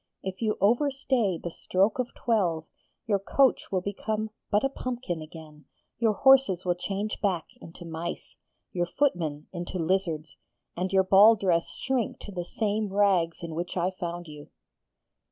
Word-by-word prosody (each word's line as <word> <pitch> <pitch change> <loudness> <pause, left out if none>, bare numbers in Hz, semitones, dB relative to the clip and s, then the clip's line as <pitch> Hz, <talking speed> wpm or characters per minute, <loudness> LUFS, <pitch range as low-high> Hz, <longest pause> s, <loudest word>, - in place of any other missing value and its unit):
If 190 +1 -5
you 215 -2 0
over 240 +8 +4
stay 255 -9 0
the 170 - -6
stroke 195 +8 +1
of 250 -1 -2
twelve, 180 -9 0 0.4
your 205 -3 +1
coach 265 +7 +2
will 185 -2 +1
become 215 +2 -3 0.2
but 205 0 +2
a 270 - +2
pumpkin 245 -11 -4
again, 155 -2 -12 0.3
your 225 -3 +3
horses 265 -8 +5
will 180 - +3
change 195 +4 -4
back 185 -6 0 0.2
into 170 +1 -11
mice, 165 +1 -6 0.4
your 175 -1 -1
footmen 170 - 0
into 175 +1 -5
lizards, 165 -3 -1 0.4
and 185 +2 -2
your 190 -1 +4
ball 200 +4 +7
dress 180 -5 +1
shrink 260 -5 -1
to 205 - -8
the 180 -2 -4
same 210 +2 -1
rags 190 -5 +2
in 165 -1 -5
which 175 +3 -4
I 180 +1 +1
found 175 -2 -5
you.' 150 -1 -11
190 Hz, 160 wpm, -27 LUFS, 170-215 Hz, 0.4 s, ball